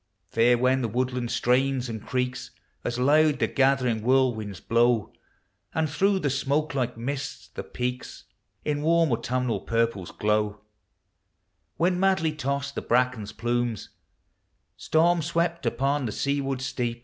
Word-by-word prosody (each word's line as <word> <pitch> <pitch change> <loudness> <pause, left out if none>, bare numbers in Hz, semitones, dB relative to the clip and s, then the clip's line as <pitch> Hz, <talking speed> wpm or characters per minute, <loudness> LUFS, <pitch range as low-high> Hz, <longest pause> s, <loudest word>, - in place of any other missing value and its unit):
Fair 120 +3 +4
when 130 +2 +2
the 120 - 0
woodland 125 +1 -1
strains 130 +1 +1
and 110 -2 -6
creaks 125 0 -2 0.3
As 120 0 -2
loud 150 +3 +4
the - - +2
gathering 130 -4 +2
whirlwinds 115 -5 +1
bio*. 115 -1 +2 0.6
And 160 -1 +1
through 195 +7 +2
the 150 -6 0
smoke 140 +3 0
like 125 -3 -1
mists 135 +4 -5
the - - -6
PeM 125 0 -3 0.7
l„ 150 - +1
wa 165 +3 +3
rm 160 - 0
autumnal 125 +1 -1
purples 115 -5 -1
glow; 105 0 0 1.2
When 180 +2 +2
madly 190 -5 +2
toss 140 -1 -2
the - - -4
bracken 125 -2 +1
splum« 120 +1 -1 1.0
Btorm 170 +2 +3
swepl 170 -2 -1
upon 135 +3 0
the - - -3
seaward 135 0 -1
steep, 120 -3 -2
i. - - -24
130 Hz, 140 wpm, -26 LUFS, 120-145 Hz, 1.2 s, Fair